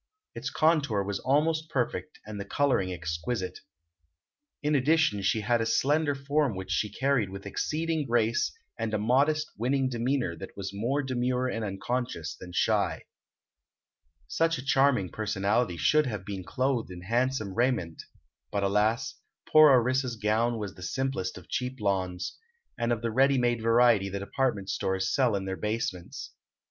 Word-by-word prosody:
Its - - -4
contour 145 -10 +2
was 100 0 -3
almost 155 +4 +1
perfect 135 +4 -2
and 105 -1 -7
the - - -3
coloring 100 -4 +1
exquisite. 90 +3 -3 1.0
In 150 +1 +1
addition 145 -6 +3
she 95 +3 +1
had 115 +2 +1
a - - 0
slender 145 +4 +2
form 140 -3 0
which 95 0 -6
she 105 - 0
carried 130 -4 +1
with 100 +1 -8
exceeding 155 +7 -1
grace 115 -1 +1 0.3
and 110 -1 -1
a - - +2
modest, 140 +8 +2
winning 130 +3 +1
demeanor 120 -5 -1
that 95 - -10
was 100 0 -5
more 125 +8 -1
demure 125 -1 0
and 115 -3 -3
unconscious 100 -4 -3
than 90 +2 -10
shy. 95 -2 +1 1.2
Such 165 - +1
a 130 - -8
charming 135 -8 +3
personality 100 -1 0
should 150 - +3
have 105 -6 -4
been 95 -2 -5
clothed 130 +1 -1
in 90 -1 -9
handsome 115 -1 0
raiment; 115 -8 0 0.5
but, 100 -1 -1
alas, 110 +8 +1 0.3
poor 155 -1 +8
Orissa's 130 -1 +3
gown 110 +2 +1
was 105 -3 -5
the 95 - -14
simplest 110 -2 -2
of 90 - -12
cheap 125 +1 -3
lawns, 95 - -2 0.4
and 120 0 -1
of 120 -1 -1
the 115 - 0
ready 135 +3 +4
made 120 -2 +1
variety 115 -3 +4
the 100 - -4
department 100 0 -1
stores 95 0 -1
sell 125 -6 +3
in 95 -1 -2
their 95 0 -3
basements. 105 -5 -4
115 Hz, 155 wpm, -28 LUFS, 100-135 Hz, 1.2 s, poor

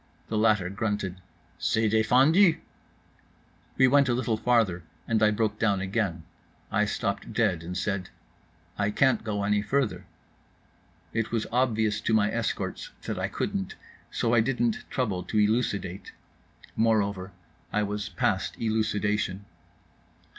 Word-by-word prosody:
The 110 - -1
latter 105 -4 +3
grunted, 100 -3 -3 0.4
"C'est 100 +6 +1
défendu." 135 - +4 1.2
We 130 - +6
went 140 0 +4
a 120 - +2
little 120 -2 0
farther, 110 -6 +2 0.3
and 110 -2 +1
I 105 - +6
broke 105 0 -1
down 100 -4 +2
again. 95 -4 -2 0.5
I 105 +2 +2
stopped 100 0 -3
dead, 105 -8 +1
and 90 +1 -5
said: 95 0 -2 0.7
"I 100 0 +2
can't 130 +4 +2
go 105 -2 -2
any 105 0 +2
farther." 110 -6 -1 1.1
It 115 -1 -1
was 115 -2 0
obvious 110 -4 +1
to 110 - +1
my 105 -1 +3
escorts 115 -1 -3
that - - -4
I - - 0
couldn't, 95 -1 -3 0.3
so 115 - 0
I 120 - +5
didn't 120 -2 0
trouble 105 -8 -1
to 110 - -2
elucidate. 105 -4 0 0.6
Moreover, 100 -4 +1 0.4
I 105 +1 +1
was 105 0 -3
past - - -1
elucidation. 105 -3 -1
105 Hz, 130 wpm, -27 LUFS, 100-115 Hz, 1.2 s, We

